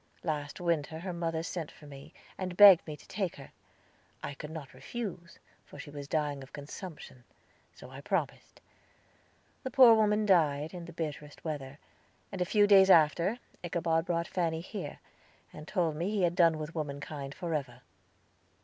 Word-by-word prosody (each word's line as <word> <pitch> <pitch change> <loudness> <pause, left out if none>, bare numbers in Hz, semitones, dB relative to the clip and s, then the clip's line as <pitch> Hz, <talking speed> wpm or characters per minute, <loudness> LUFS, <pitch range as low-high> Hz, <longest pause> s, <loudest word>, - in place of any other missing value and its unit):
Last 150 -2 -3
winter 165 -3 -1
her 185 0 -4
mother 165 -1 -2
sent 170 -2 -4
for - - -16
me, 140 -1 -12 0.2
and 185 -1 -5
begged 200 -5 +9
me 150 -1 -6
to - - -18
take 195 -5 -3
her. 135 - -12 0.7
I - - -4
could 150 +1 -8
not 155 -4 -8
refuse, 185 -8 -7 0.3
for - - -14
she 145 - -9
was 145 -1 -8
dying 145 -2 -1
of 135 - -13
consumption; 145 -3 -9 0.5
so - - -12
I 135 +1 -9
promised. 160 -3 -3 1.0
The 260 - -4
poor 255 -4 +8
woman 215 -1 +3
died, 155 -5 +2
in 175 -2 -7
the 170 - -10
bitterest 150 -2 -6
weather, 145 -3 -5 0.5
and 195 -2 -5
a - - +2
few 205 +3 +4
days 195 -2 +7
after 170 +5 +4 0.3
Ichabod 165 -1 0
brought 170 -1 -1
Fanny 165 -3 -1
here, 180 -4 -7 0.6
and 150 - -10
told 170 -6 0
me 170 +5 -2
he 210 -3 0
had 175 -1 +2
done 170 -3 +4
with 155 +1 -6
womankind 140 -2 -5
forever. 155 -8 -4
165 Hz, 165 wpm, -31 LUFS, 150-180 Hz, 1.0 s, begged